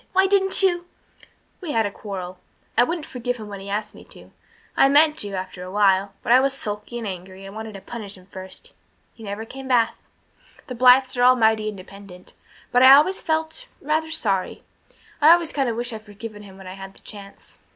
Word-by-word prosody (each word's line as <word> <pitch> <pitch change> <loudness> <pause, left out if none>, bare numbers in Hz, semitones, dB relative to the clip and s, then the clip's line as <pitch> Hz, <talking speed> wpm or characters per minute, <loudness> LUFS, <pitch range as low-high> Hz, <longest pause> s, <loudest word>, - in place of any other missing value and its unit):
why 380 +1 +4
didn't 385 0 +3
you 350 -2 +1 0.4
" - - -28
"We 335 -5 -4
had 225 -1 +2
a 205 - -3
quarrel. 185 -3 -7 0.4
I - - +5
wouldn't 325 +4 -3
forgive 245 -3 -4
him 215 -2 -9
when 200 -1 -7
he 195 +1 -9
asked 210 +1 -3
me - - -14
to. - - -15 0.4
I 270 - +5
meant 300 +2 +5
to, 205 -1 -3
after 185 -1 -6
awhile 195 +1 +1
but - - -1
I 250 - +8
was 270 0 +1
sulky 210 +1 -6
and 235 - -5
angry 190 0 -8
and 195 - -10
I - - -14
wanted 220 -1 -7
to 195 - -9
punish 205 -4 -8
him 180 - -17
first. 190 -1 -11 0.4
He - - -18
never 210 +1 -6
came 265 +3 -9
back 240 -3 +3 0.7
the 255 - -7
Blythes 255 +2 +5
were 245 - -1
all 255 +1 +7
mighty 220 -2 +2
independent. 195 -2 -12 0.4
But 245 - +4
I 260 +1 +10
always 340 +7 +3
felt 320 +9 -2
rather 310 +2 -1
sorry. 200 - -2 0.6
I've 310 +3 +9
always 340 -2 0
kind 270 -4 0
of 230 - -2
wished 240 +1 -3
I'd 220 - -7
forgiven 210 0 -10
him 195 -2 -13
when 190 - -13
I 185 - -8
had 195 0 -10
the - - -19
chance." 200 -2 -12
220 Hz, 215 wpm, -22 LUFS, 195-270 Hz, 0.7 s, I